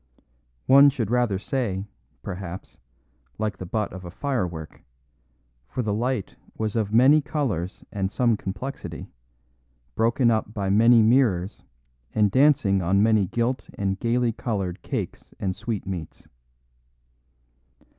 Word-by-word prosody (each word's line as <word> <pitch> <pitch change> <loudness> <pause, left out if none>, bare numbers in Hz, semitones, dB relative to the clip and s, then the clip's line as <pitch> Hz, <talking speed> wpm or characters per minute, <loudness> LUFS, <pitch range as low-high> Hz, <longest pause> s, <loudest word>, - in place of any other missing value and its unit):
One 140 +2 +8
should 120 -6 -3
rather 120 -5 +2
say, 100 -4 -2 0.4
perhaps, 95 -2 -7 0.6
like 110 -1 -2
the 95 - -6
butt 105 +2 -2
of 95 0 -8
a 90 - -7
firework, 90 - -4 0.9
for 125 - -2
the 105 -2 -1
light 120 -1 -2 0.2
was 110 -1 -2
of 105 -3 0
many 130 +7 +6
colours 110 - -3
and 95 -2 -2
some 120 -1 +2
complexity, 105 +8 -6 0.8
broken 115 +2 +2
up 110 -1 -1
by 100 -2 -1
many 115 +2 +6
mirrors 110 -6 +2 0.5
and 105 -2 +3
dancing 130 -8 +4
on 95 +4 +2
many 110 -3 +3
gilt 120 +6 -2
and 95 -1 -2
gaily 120 0 +1
coloured 100 -6 -3
cakes - - -5
and 95 -1 -2
sweetmeats. 95 -6 -5
110 Hz, 125 wpm, -25 LUFS, 95-120 Hz, 0.9 s, One